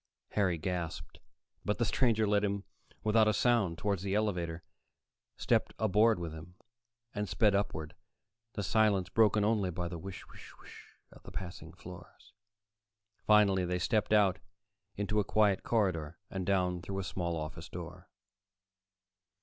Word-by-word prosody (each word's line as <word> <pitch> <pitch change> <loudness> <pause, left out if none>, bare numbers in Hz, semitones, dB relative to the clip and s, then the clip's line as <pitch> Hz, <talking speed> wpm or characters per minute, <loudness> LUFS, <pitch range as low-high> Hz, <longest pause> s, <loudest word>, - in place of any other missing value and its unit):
Harry 95 -5 +1
gasped, 85 0 -4 0.4
but 105 - -1
the 120 - +1
stranger 110 -2 +2
led 105 0 +2
him 100 -1 -1 0.4
without 110 0 +4
a 110 - +3
sound 105 -8 +2
toward 100 0 -1
the 95 +2 -2
elevator, 90 -6 -1 0.7
stepped - - +1
aboard 110 +1 +3
with 85 -2 -5
him, 80 +3 -11 0.6
and 105 -2 -3
sped 100 +4 +3
upward, 90 -5 -2 0.6
the 105 - -3
silence 100 -3 +2
broken 110 -2 +3
only 105 -4 +1
by 90 0 -3
the 85 -1 -6
whish 95 +2 -8
whish - - -13
whish - - -15 0.2
of - - -16
the - - -12
passing 90 +1 -7
floors. - - -13 0.9
Finally 100 -3 +5
they 90 0 -1
stepped 105 +5 0
out 100 -5 +4 0.6
into 105 +1 0
a - - +2
quiet 100 -1 +2
corridor 85 -8 0
and 95 -2 -4
down 90 -2 +1
through 95 +2 -5
a 95 - -2
small 85 -1 -3
office 80 +1 -6
door. 90 +1 -9
95 Hz, 150 wpm, -32 LUFS, 85-105 Hz, 0.9 s, Finally